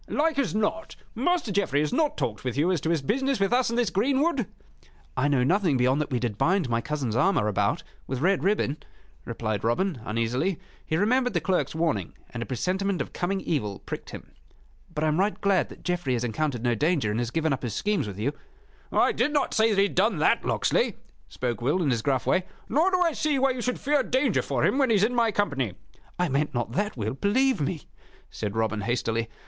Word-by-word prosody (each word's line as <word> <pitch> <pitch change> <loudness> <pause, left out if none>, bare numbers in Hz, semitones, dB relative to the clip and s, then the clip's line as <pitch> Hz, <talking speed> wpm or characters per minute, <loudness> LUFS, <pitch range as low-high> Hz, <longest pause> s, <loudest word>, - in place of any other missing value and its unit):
"Like 310 -1 +1
as 250 -6 0
not, 220 +10 -1 0.2
Master 315 - 0
Geoffrey 190 -8 +1
has 150 - -1
not 310 -2 +1
talked 110 -2 -3
with 125 0 -3
you 165 +6 +3
as 175 -6 0
to 160 - -1
his 165 -4 +1
business 265 - 0
with 195 +4 +1
us 250 -1 +3
in 235 - -2
this 235 -7 +1
greenwood?" 270 - +1 0.7
"I 145 - +1
know 140 -4 +2
nothing 175 -1 +2
beyond 130 +4 +2
that 150 - -3
we 125 - 0
did 115 -4 -3
bind 185 -3 +2
my 115 0 +1
cousin's 140 -7 -3
armor 140 - +2
about 105 - 0 0.2
with 130 -1 -3
red 190 +6 +2
ribbon," 190 -8 +1 0.5
replied 110 -1 -3
Robin, 130 - 0
uneasily. 115 - -1 0.2
He 155 - -1
remembered 245 +4 +2
the - - +4
clerk's 180 0 0
warning, 160 - -1 0.2
and 115 - -5
a 115 - -4
presentiment 185 - -1
of - - -4
coming 190 +2 -1
evil 105 - -2
pricked - - -7
him. - - -10 0.6
"But 155 -2 -3
I - - +3
am 155 +2 +1
right 205 +2 +1
glad 195 -2 +2
that - - -13
Geoffrey 175 -7 -1
has 120 -1 -1
encountered 125 +1 -2
no 120 -1 +2
danger, 145 -2 +1
and 110 - -1
has 120 -1 -1
given 160 +2 0
up 135 - -3
his 120 -4 -4
schemes 205 - 0
with 100 -2 -7
you." 125 +8 -1 0.6
"I - - +3
did 295 - +1
not 290 -2 0
say 220 +1 +4
that 210 - 0
he 195 - +5
had 200 - -1
done 200 0 +2
that, 150 - +3
Locksley," - - +1 0.3
spoke 120 -2 -3
Will, 145 +9 +1
in 140 - +2
his 120 -2 0
gruff 130 +1 0
way. 185 0 +2 0.2
"Nor 320 +6 +3
do 365 -1 +1
I 340 -2 +3
see 300 -2 0
why 270 0 +3
you 250 -1 -4
should 250 +2 -2
fear 290 0 +2
danger 260 +2 +1
for - - 0
him 270 - +2
when 270 -3 +3
he 225 - +4
is 200 - +3
in 230 +3 +2
my 235 -2 +2
company." 140 - -1 0.4
"I 180 0 +1
meant 140 -1 -1
not 120 -1 -1
that, 205 - -2
Will, 110 -1 -2
believe 245 - +2
me," 150 +2 -2 0.5
said 105 -1 -4
Robin, 110 -1 0
hastily. 115 0 -1
170 Hz, 230 wpm, -26 LUFS, -, 0.7 s, he